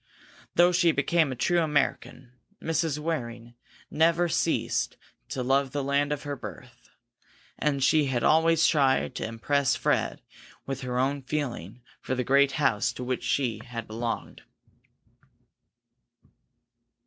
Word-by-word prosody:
Though 175 +1 +6
she 175 0 +2
had 165 - +4
become 155 +1 +2
a - - -4
true 175 +8 +1
American, 145 -4 -1 0.3
Mrs. 160 -2 -1
Waring 125 -7 -4
had 120 - -18 0.4
never 165 +3 +3
ceased 165 - 0 0.3
to 130 - -3
love 135 +1 +1
the 145 -1 -1
land 140 +1 +1
of 145 -1 -3
her 145 -1 -4
birth, 105 - -11 0.7
and 140 -3 0
she 155 +1 +4
had 130 -3 -1
always 165 +1 +4
tried 135 -4 +2
to - - -4
impress 120 +3 0
Fred - - -1 0.4
with 135 0 -4
her 125 -1 -3
own 135 +2 0
feeling 125 - -4 0.2
for 130 - -2
the 125 - -1
great 140 +2 +3
house 130 -9 +1
to 125 - -7
which 125 0 -3
she 120 -6 0
had 115 -2 -6
belonged. 115 +1 -5
140 Hz, 140 wpm, -27 LUFS, 125-150 Hz, 0.7 s, Though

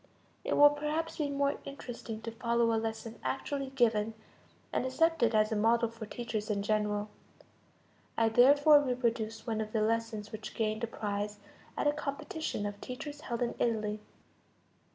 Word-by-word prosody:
It - - 0
will 290 0 +9
perhaps 300 +3 -2
be 295 -2 0
more 280 0 0
interesting 240 -5 -7
to 230 - -4
follow 235 0 +1
a 225 - +1
lesson 225 0 -5
actually 275 0 -2
given, 225 -4 +2 0.6
and - - +1
accepted 260 -3 +2
as 215 +1 +3
a - - +1
model 230 +2 +3
for 225 -1 -8
teachers 220 -2 -4
in 200 -1 0
general. 210 0 0 1.1
I 225 0 +4
therefore 285 +5 +7
reproduce 230 -4 -1
one 220 -2 -1
of 215 0 -5
the 220 - +2
lessons 220 -1 -1
which 215 -1 -7
gained 220 0 -1
a - - +1
prize 205 -1 -3 0.4
at - - 0
a 290 - +4
competition 300 - -3
of 205 0 -5
teachers 290 +3 -7
held 235 -3 -2
in 235 - -1
Italy. 215 -2 0
230 Hz, 160 wpm, -31 LUFS, 215-275 Hz, 1.1 s, will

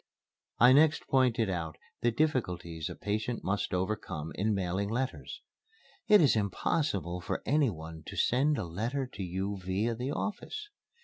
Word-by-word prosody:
I 125 +2 +7
next 150 +2 +4
pointed 125 -4 +3
out 85 -4 -3 0.2
the 120 - +3
difficulties 90 - -1
a 90 - -6
patient 110 +3 -2
must 100 +2 -1
overcome 90 -4 -2
in 105 +3 0
mailing 95 +1 -1
letters: 130 +4 -3 0.6
"It 210 -3 +7
is 145 -7 +5
impossible 100 - 0
for - - -3
any 145 -2 +3
one 80 -3 -8
to - - -7
send 140 +4 +2
a - - -2
letter 115 +11 -2
to 125 -5 -9
you 95 +2 -2
via 95 +6 0
the 125 +4 -3
office. 415 - -4
105 Hz, 150 wpm, -31 LUFS, 90-130 Hz, 0.6 s, I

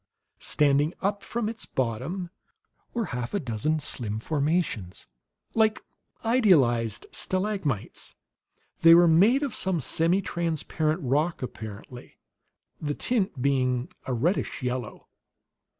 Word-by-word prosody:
Standing 145 +2 +2
up 200 +1 0
from 230 +1 -3
its 225 0 -5
bottom 135 - -3 0.6
were 235 -2 -1
half 125 +6 -3
a - - +1
dozen 135 - -1
slim 110 -7 -2
formations, 145 - -1 0.5
like 220 -1 +2 0.4
idealized 135 - +3
stalagmites; 185 - -2 0.6
they 165 0 +8
were 175 0 +7
made 205 - +5
of 275 - -2
some 190 -2 -1
semitransparent 165 0 0
rock, 150 +5 0
apparently, 110 +1 -8 0.6
the 145 -1 -2
tint 195 - -1
being 130 -2 +1 0.2
a 130 - -1
reddish 155 - -1
yellow. 125 -2 -4
155 Hz, 105 wpm, -27 LUFS, 125-190 Hz, 0.6 s, they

